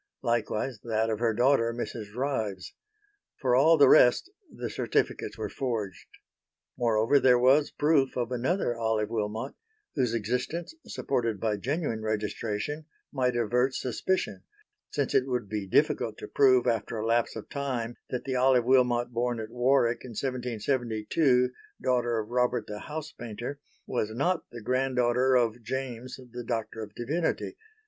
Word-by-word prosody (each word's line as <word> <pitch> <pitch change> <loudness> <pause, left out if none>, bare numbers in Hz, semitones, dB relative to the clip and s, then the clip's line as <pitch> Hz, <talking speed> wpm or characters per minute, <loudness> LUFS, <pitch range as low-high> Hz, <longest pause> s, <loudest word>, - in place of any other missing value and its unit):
Likewise 115 0 -1
that 110 -1 0
of 110 - -2
her 115 -1 +2
daughter 120 +1 +3
Mrs. 110 -3 -6
Ryves. 110 -8 -2 0.6
For 125 -3 +2
all 160 +5 +6
the 140 -2 +7
rest 125 - +5 0.2
the - - -5
certificates - - -1
were - - -3
forged. 110 -9 -4 0.7
Moreover 115 +3 +3
there 125 -2 +5
was 135 +4 +4
proof 145 -4 +2
of 120 -1 -1
another 125 +2 0
Olive 110 -2 0
Wilmot 110 +3 -2 0.4
whose 125 -4 0
existence, 125 - -2
supported 115 -6 -1
by 110 0 0
genuine 135 - -2
registration, 110 +6 -3 0.3
might 125 -3 +1
avert 125 +3 +1
suspicion; 185 +9 -1 0.5
since 140 -3 -1
it 130 0 +3
would 125 -5 -2
be 105 -1 -4
difficult - - +2
to - - -8
prove 130 -3 +4
after 115 -2 -1
a 110 - -2
lapse 115 +1 +1
of 110 - -7
time 125 -4 -3
that 125 - -3
the 130 -1 -2
Olive 125 -1 +4
Wilmot 125 -2 +3
born 120 0 -1
at 110 0 -6
Warwick 120 -1 +2
in 125 - -8
1772 125 +1 0 0.3
daughter 120 -2 +1
of 110 0 -3
Robert 125 -2 +1
(the 105 0 -6
house 150 +4 -6
painter), 120 +4 -6 0.3
was 110 -4 -1
not 150 +11 -1
the 120 - -9
granddaughter 130 0 +2
of 120 -1 +2
James 130 +1 -5
(the 120 0 -5
Doctor 115 -1 -3
of 105 -1 -8
Divinity). 155 +8 -2
120 Hz, 150 wpm, -28 LUFS, 115-130 Hz, 0.7 s, the